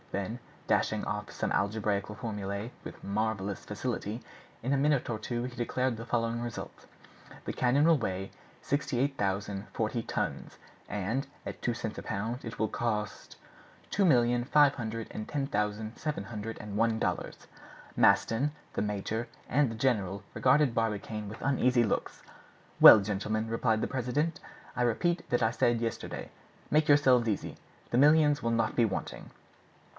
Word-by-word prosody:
Then, 100 +5 -3 0.3
dashing - - +1
off - - -4
some - - -2
algebraical 100 0 0
formulae 105 0 -4
with - - -9
marvelous 100 -1 -2
facility, 110 +1 -4 0.4
in 130 +3 +1
a - - +3
minute 140 -2 +2
or 110 - -3
two 120 +2 -3
he 125 0 -5
declared 125 +1 0
the 115 +1 -7
following 115 0 0
result: 120 -1 -7 0.6
"The - - -3
cannon 130 +4 +3
will 165 -3 +5
weigh 95 -3 -3 0.3
68,040 110 -5 -1
tons. - - -3 0.3
And, 105 +7 -2 0.2
at - - -6
two 120 - 0
cents 110 -2 -5
a - - -8
pound, 115 +4 -3
it 115 - -7
will 110 - +1
cost—" 105 -3 -3 0.5
"Two 200 - +2
million 120 -7 +4
five 145 +1 +5
hundred 115 -2 -4
and 110 - -6
ten 145 -2 -1
thousand 105 0 -2
seven 150 -10 -3
hundred 110 +1 -6
and 105 -1 -7
one 115 +1 +2
dollars." - - -3 0.5
Maston, 130 +6 +3 0.2
the - - -1
major, 105 +3 -2 0.2
and 140 -3 +2
the - - -5
general 100 -6 0
regarded 135 0 +3
Barbicane 105 -1 -2
with 110 - -9
uneasy 125 -2 +3
looks. 110 - -2 0.6
"Well, - - +12
gentlemen," 105 +2 -2
replied 115 -1 +1
the - - 0
president, 140 +6 -1 0.4
"I - - -1
repeat 170 +9 +1
what 120 -1 +2
I 110 - +3
said 120 0 +2
yesterday. 115 -1 -4 0.4
Make 155 +1 +3
yourselves 130 -5 +5
easy; 105 - -2 0.4
the 120 - +2
millions 150 0 +5
will 115 - 0
not 115 0 +1
be 120 - +4
wanting." 105 -4 -3
115 Hz, 155 wpm, -30 LUFS, 105-130 Hz, 0.6 s, Well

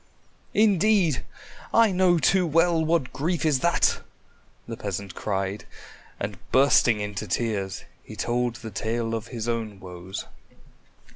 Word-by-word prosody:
"Indeed! 205 - +3 0.5
I 230 -2 +5
know 180 -1 +3
too 180 +4 +3
well 165 +1 +3
what 160 -4 0
grief 165 +3 -1
is 150 -4 +3
that!" 170 +5 +2 0.7
the 115 - -5
peasant 100 -4 -5
cried, 100 +1 -3 0.5
and - - -4
bursting 130 -4 +4
into 105 -2 -4
tears, 100 -5 -2 0.2
he - - -10
told 120 0 -1
the 115 -3 -8
tale 115 +2 -2
of 115 0 -3
his 115 -2 -5
own 110 -4 -3
woes. 90 0 -7
120 Hz, 130 wpm, -25 LUFS, 105-165 Hz, 0.7 s, I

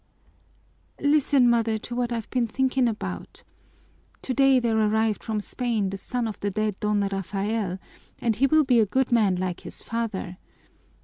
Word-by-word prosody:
"Listen, 285 -3 +3
mother, 230 -2 +2
to 235 - -8
what 245 -1 -1
I've 230 -2 -3
been 245 -2 +1
thinking 260 +2 +1
about. 220 -2 -5 0.8
Today 270 0 +4
there 235 -2 0
arrived 220 0 +1
from 220 -2 -2
Spain 220 -2 -2
the 195 - -4
son 240 +4 -3
of 215 - -6
the 205 - -1
dead 215 0 -2
Don 210 -1 +1
Rafael, 195 0 -2 0.4
and 230 -2 0
he 270 +6 +3
will 310 +2 +4
be 250 -4 +3
a 215 - +3
good 260 +5 0
man 215 -6 +3
like 180 -1 -3
his - - -6
father. 215 -6 -4
225 Hz, 165 wpm, -25 LUFS, 205-245 Hz, 0.8 s, Today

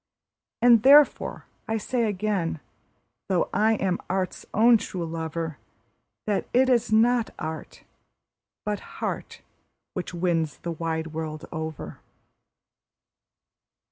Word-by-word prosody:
And 240 -3 +7
therefore 285 +4 +5 0.2
I 225 - 0
say 235 +2 -1
again, 190 -5 -1 0.7
though 185 -3 +1
I 215 +3 +3
am 185 -3 -1
art's 185 0 -2
own 230 +2 +6
true 180 -4 -5
lover, 160 -3 -4 0.7
That 210 -2 -1
it 260 +1 +4
is 240 -3 +2
not 230 +1 +3
art, 160 +1 -6 0.8
but 210 -1 -1 0.2
heart, - - -4 0.5
which 185 - -4
wins 170 -4 0
the 170 - -2
wide 160 -1 -3
world 155 -1 -5
over. 160 -1 -6
185 Hz, 110 wpm, -26 LUFS, 160-220 Hz, 0.8 s, And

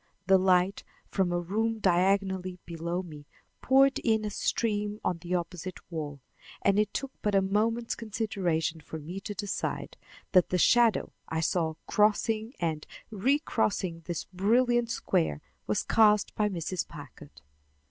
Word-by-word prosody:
The 190 0 +5
light 185 +1 +2 0.3
from 190 -3 0
a 175 - +1
room 220 +6 -1
diagonally 190 -1 +1
below 170 +2 -3
me 150 -4 -11 0.3
poured 270 +1 +4
in 220 -2 +1
a 210 - -3
stream 210 -1 -1
on 175 - 0
the 175 +2 -2
opposite 180 +1 -4
wall, 145 -4 -5 0.4
and 200 +1 +3
it 210 -1 +1
took 275 -1 -4
but 210 -1 0
a - - +6
moment's 225 +4 0
consideration 185 -8 -2
for 160 - -7
me 165 +5 -6
to 205 +1 -6
decide 205 0 -3 0.3
that 180 -2 +4
the 180 - +1
shadow 235 +4 +4 0.2
I 160 0 -1
saw 160 -1 0
crossing 215 +3 +1
and 160 -3 -2 0.2
recrossing 210 - 0
this 175 -3 -3
brilliant 235 +5 +2
square 75 - 0 0.3
was 105 - 0
cast 210 -2 +4
by 210 -1 +1
Mrs. 180 -1 -3
Packard. 140 - -12
190 Hz, 145 wpm, -29 LUFS, 170-215 Hz, 0.4 s, a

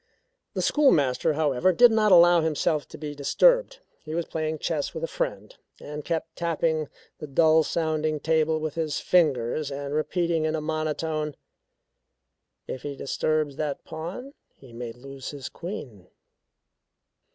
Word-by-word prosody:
The - - -1
schoolmaster, 155 - +3
however, 150 +2 +2
did 240 +6 +6
not 215 -2 +3
allow 175 -1 +7
himself 155 -1 0
to - - -11
be 150 -1 -6
disturbed. - - +3 0.2
He 155 0 -5
was 170 -1 -1
playing 155 -1 -3
chess 150 -1 -2
with - - -5
a - - 0
friend, - - -4 0.2
and 150 0 -7
kept 165 0 -3
tapping 160 -2 -1 0.3
the 150 - -6
dull 160 +3 +4
sounding 155 -1 -1
table 160 0 +1
with 155 -1 -3
his 155 -2 -2
fingers, 150 -4 +1
and 140 0 -5
repeating 165 +1 0
in 155 0 0
a - - -1
monotone: 155 -1 -2 1.3
"If 130 - -5
he 145 -1 -5
disturbs 150 +1 -1
that 150 -2 -3
pawn, 175 - -7 0.2
he 130 -4 -16
may 120 0 -6
lose 135 +2 -9
his 140 -3 -7
queen." 130 - -8
155 Hz, 145 wpm, -26 LUFS, 145-170 Hz, 1.3 s, allow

